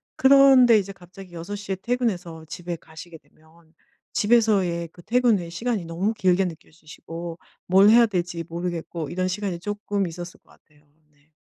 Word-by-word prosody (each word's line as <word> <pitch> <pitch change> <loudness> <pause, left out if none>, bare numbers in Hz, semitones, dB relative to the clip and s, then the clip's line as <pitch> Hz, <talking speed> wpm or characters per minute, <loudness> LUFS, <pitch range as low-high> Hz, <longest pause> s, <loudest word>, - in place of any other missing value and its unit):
그런데 265 -3 +6
이제 200 -1 -2
갑자기 185 0 -14
6 170 +4 -6
시에 200 -1 -4
퇴근해서 190 -10 -2
집에 175 +1 -6
가시게 160 +1 -12
되면 160 +2 -26 0.4
집에서의 205 -7 +2
그 175 - -15
퇴근 235 +1 +2
후에 170 -1 -7
시간이 215 +2 -3
너무 175 +6 -2
길게 190 -2 +2
느껴지시고 165 0 -9 0.3
뭘 195 +3 +6
해야 235 +2 +7
될지 175 -5 -3
모르겠고 170 -2 -5
이런 185 +1 -2
시간이 185 -2 -3
쪼끔 205 +1 -3
있었을 175 +1 -9
것 - - -26
같아요. 150 -1 -26 0.3
네. 145 +1 -34
180 Hz, 345 characters per minute, -24 LUFS, 170-205 Hz, 0.4 s, 해야